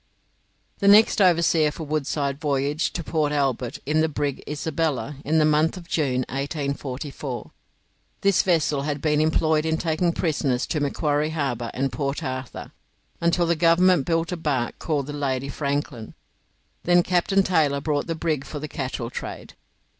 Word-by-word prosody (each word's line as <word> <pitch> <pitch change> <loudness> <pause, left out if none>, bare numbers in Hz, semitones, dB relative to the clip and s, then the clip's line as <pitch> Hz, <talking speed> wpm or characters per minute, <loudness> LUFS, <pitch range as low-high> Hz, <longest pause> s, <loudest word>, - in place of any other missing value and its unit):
The 200 - +1
next 210 +1 +6
overseer 170 -4 +4
for 155 +2 -7
Woodside 145 -2 -2
voyaged 145 +1 0
to 170 - -3
Port 155 -2 0
Albert 135 -4 -1
in 155 +3 +2
the 160 - +2
brig 145 -2 -3
'Isabella' 150 -1 -2
in 155 +2 +1
the 155 - +4
month 155 +3 +2
of 170 -2 -10
June, 135 -7 0
1844. 140 -1 -4 0.7
This 200 -2 +4
vessel 160 -5 +1
had 145 0 -2
been 150 0 +1
employed 155 0 +2
in 160 0 0
taking 165 +1 0
prisoners 140 -7 0
to 155 - -2
Macquarie 145 +1 0
Harbour 135 -7 -2
and 135 0 -1
Port 140 +5 -3
Arthur 130 -2 -5 0.5
until 170 +1 +2
the 170 0 +2
government 170 -1 +4
built 165 +1 0
a 180 - -2
barque 140 -7 -2
called 145 -4 -1
the 145 - -6
'Lady 140 -2 -2
Franklin'; 140 -5 -3 0.7
then 175 0 +4
Captain 185 +2 +2
Taylor 155 -7 +2
bought 145 -1 -1
the 165 - -2
brig 155 -4 -1
for 150 - -7
the 150 +1 -5
cattle 130 -5 -4
trade. - - -7
150 Hz, 160 wpm, -24 LUFS, 140-165 Hz, 0.7 s, next